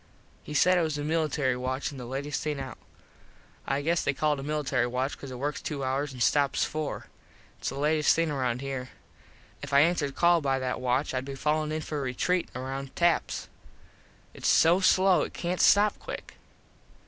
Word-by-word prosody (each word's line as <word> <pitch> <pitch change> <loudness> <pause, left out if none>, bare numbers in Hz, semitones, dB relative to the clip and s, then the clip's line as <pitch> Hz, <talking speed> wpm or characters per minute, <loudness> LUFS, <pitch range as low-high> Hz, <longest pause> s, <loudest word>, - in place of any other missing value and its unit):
He 150 - -8
said 180 +4 +5
it - - +2
was 155 -3 -1
a 145 - -3
military 150 -4 0
watch 130 +3 -3
an 140 - -9
the 125 - -7
latest 140 +3 -3
thing 150 -2 -2
out. 135 -1 -7 0.9
I 140 +1 0
guess 170 +2 +1
they 140 - 0
call 150 +1 +2
it 145 - -4
a - - -5
military 140 -4 0
watch 130 +3 -2
cause 140 - -9
it 130 - -7
works 145 +2 -3
two 140 -3 -4
hours 135 +2 -1
and 125 -2 -2
stops 140 -2 +2
four. 155 -1 -4 0.5
Its - - -2
the 135 - -6
latest 150 +1 +3
thing 165 -2 0
round 125 -3 -1
here. 135 -2 -4 0.7
If 145 -1 -7
I 140 - +7
answered 155 -4 +1
call 170 -1 +4
by 135 -2 +1
that 130 -1 -3
watch 130 +3 0
Id 130 0 -1
be 140 0 -6
fallin 150 +2 0
in 155 0 -2
for 150 -1 -4
retreat 155 +8 0
round 135 +1 -5
taps. 170 -1 +1 0.9
Its - - -4
so 170 +3 +5
slow 190 -1 +4
it - - -4
cant 175 +1 -2
stop 205 +1 +5
quick. - - -7
145 Hz, 195 wpm, -28 LUFS, 135-155 Hz, 0.9 s, I